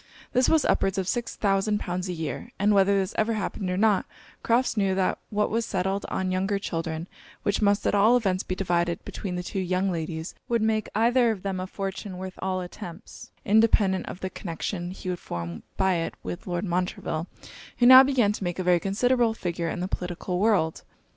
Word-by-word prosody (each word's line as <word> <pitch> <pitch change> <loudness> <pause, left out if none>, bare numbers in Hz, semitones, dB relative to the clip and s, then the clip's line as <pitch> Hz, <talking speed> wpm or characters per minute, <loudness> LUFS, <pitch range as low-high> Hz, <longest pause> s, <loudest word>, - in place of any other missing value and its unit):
This 255 +1 +3
was 320 -2 +3
upwards 195 0 +1
of 190 -2 -1
six 240 +3 -2
thousand 205 +1 +1
pounds 180 0 -3
a - - -1
year; 165 +7 -5
and 205 +1 +3
whether 200 0 +4
this 190 -1 -1
ever 220 +1 +2
happened 200 -2 -3
or 180 - -1
not, 210 -1 +3 0.3
Crofts 240 +3 +2
knew 195 -3 +1
that 190 -1 0
what 210 0 0
was 230 +2 +1
settled 195 -1 -2
on 185 -1 -1
younger 195 +2 0
children, 165 -3 -4 0.4
which 200 - 0
must 200 0 +2
at - - +2
all 215 +4 +5
events 190 -5 0
be 185 - -4
divided 175 -2 0
between 185 -3 -5
the 180 - -3
two 195 - -4
young 185 +1 0
ladies, 160 0 -4 0.2
would 235 -2 +2
make 220 -1 0
either 240 +2 +4
of 210 -5 -3
them 195 -2 -2
a 185 - -4
fortune 195 0 -5
worth 185 0 -7
all 185 -1 -1
attempts, 175 +1 -9 0.2
independent 205 -3 +3
of - - -7
the 185 - -3
connection 175 0 -4
he 185 0 -8
would 180 -1 -2
form 85 -1 -6 0.2
by 190 -1 +3
it 165 - -3
with 175 - -6
Lord 175 +1 -2
Montreville, 175 -2 -2 0.5
who 245 - +3
now 260 +1 +11
began 260 -6 +3
to 210 - -5
make 175 -1 -2
a 185 - -2
very 180 -1 +4
considerable 230 +4 +1
figure 170 -4 -3
in 175 - -4
the 180 - -1
political 180 0 -3
world. 195 -7 +2
190 Hz, 205 wpm, -26 LUFS, 180-210 Hz, 0.5 s, now